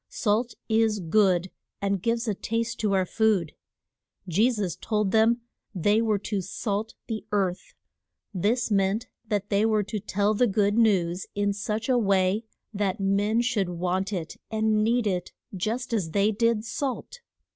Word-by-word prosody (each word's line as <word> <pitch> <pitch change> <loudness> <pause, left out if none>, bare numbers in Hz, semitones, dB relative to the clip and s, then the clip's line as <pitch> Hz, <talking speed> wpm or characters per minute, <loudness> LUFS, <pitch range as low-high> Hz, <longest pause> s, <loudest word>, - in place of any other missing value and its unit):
Salt 230 +2 0
is 220 -1 +2
good, 185 0 +2 0.3
and 200 -2 -1
gives 230 +2 0
a 215 - +1
taste 230 +3 -2
to 210 -2 +1
our 190 -1 +2
food. 200 -5 +1 0.7
Je 205 +8 +3
sus 210 -8 -2
told 210 -3 -1
them 225 +2 +3 0.3
they 205 +5 +3
were 220 -2 +2
to 200 0 -3
salt 205 +3 -3
the 220 -2 -4
earth. 190 -3 -1 0.6
This 220 +5 0
meant 200 +3 +1 0.2
that 205 -2 -1
they 200 +1 +3
were 215 -1 +2
to 210 +2 -4
tell 205 +1 0
the 245 +3 +3
good 205 0 +2
news 190 -6 +2
in 205 0 +1
such 210 +2 -3
a 255 -2 +3
way 195 0 +2 0.3
that 200 -2 -1
men 200 +4 +2
should 230 -7 0
want 180 +3 -1
it 175 -5 -4
and 220 -1 +1
need 235 +1 +2
it 180 -3 -2 0.2
just 225 +6 -2
as 195 -8 0
they 200 +6 +2
did 230 0 +1
salt. 275 - -4
210 Hz, 160 wpm, -26 LUFS, 195-225 Hz, 0.7 s, Je